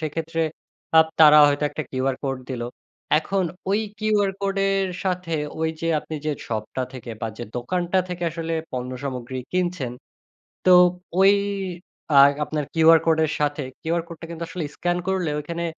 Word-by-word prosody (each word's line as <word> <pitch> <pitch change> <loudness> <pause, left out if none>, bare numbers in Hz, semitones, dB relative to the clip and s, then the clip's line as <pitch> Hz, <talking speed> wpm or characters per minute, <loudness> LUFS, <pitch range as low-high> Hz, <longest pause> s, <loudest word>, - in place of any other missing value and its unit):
সেক্ষেত্রে 165 +1 -3 0.6
আপ 160 - +7
তারা 150 -1 +9
হয়তো 145 +1 0
একটা 155 - -4
QR 130 0 0
Code 135 -2 -2
দিলো। 120 -2 -3 0.5
এখন 190 +4 -1 0.3
ওই 205 +2 +2 0.2
QR 210 -2 +2
Code 195 0 -1
এর 195 -1 +1 0.2
সাথে 180 -2 -2 0.3
ওই 160 - +1
যে 165 - -2
আপনি 160 - -8
যে 155 - +2 0.2
শপটা 110 +3 -3
থেকে 130 -2 -8
বা - - -2
যে 120 - -4
দোকানটা 175 +9 0
থেকে 180 -1 -5
আসলে 165 0 -4 0.2
পণ্য 125 0 -3
সামগ্রী 130 -1 -4
কিনছেন, 180 -8 -1 0.7
তো - - +6 0.5
ওই 195 +1 +7 0.8
আ - - +9 0.3
আপনার 150 -1 -3
QR 165 0 +7
Code 160 -1 +3
এর 155 - -3
সাথে 145 0 0 0.2
QR 165 +1 0
Code 170 -1 -10
টা 165 - -7
কিন্তু 170 0 -5
আসলে 175 -2 -4
স্ক্যান 175 0 0
করলে 185 -4 0
ঐখানে 170 +3 -4
165 Hz, 165 wpm, -23 LUFS, 145-180 Hz, 0.8 s, তারা